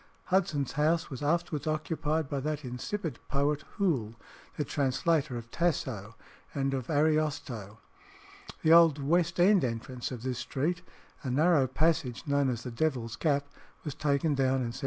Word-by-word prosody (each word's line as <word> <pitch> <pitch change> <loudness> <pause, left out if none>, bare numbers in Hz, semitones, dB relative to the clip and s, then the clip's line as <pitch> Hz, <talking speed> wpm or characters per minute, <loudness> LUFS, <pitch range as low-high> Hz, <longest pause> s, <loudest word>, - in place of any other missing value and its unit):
Hudson's 155 -8 +1
house 160 +3 +1
was 130 - -6
afterwards 155 0 0
occupied 155 0 -1
by 140 0 -2
that 150 +1 -3
insipid 125 - -4
poet, 145 +2 +1 0.2
Hoole, 130 - 0 0.4
the 150 - -1
translator 140 0 0
of 115 0 -9
Tasso 130 - -1 0.4
and 135 -1 0
of 130 -3 -3
Ariosto. 145 -9 0 0.9
The 160 0 +6
old 165 -3 +7
West 170 +4 +1
End 190 +2 +5
entrance 120 +1 -3
of 125 -3 -7
this 130 -1 -2
street, 145 +8 -1 0.4
a 135 - -4
narrow 145 +1 +4
passage 155 -2 0
known 140 -2 +2
as 120 -2 -3
the 125 - -5
"Devil's 120 -4 -1
Gap," 145 -3 +1 0.4
was 150 - -3
taken 145 +1 +1
down 135 -1 +2
in 130 -2 +1
1765. - - -7
145 Hz, 155 wpm, -30 LUFS, 130-160 Hz, 0.9 s, old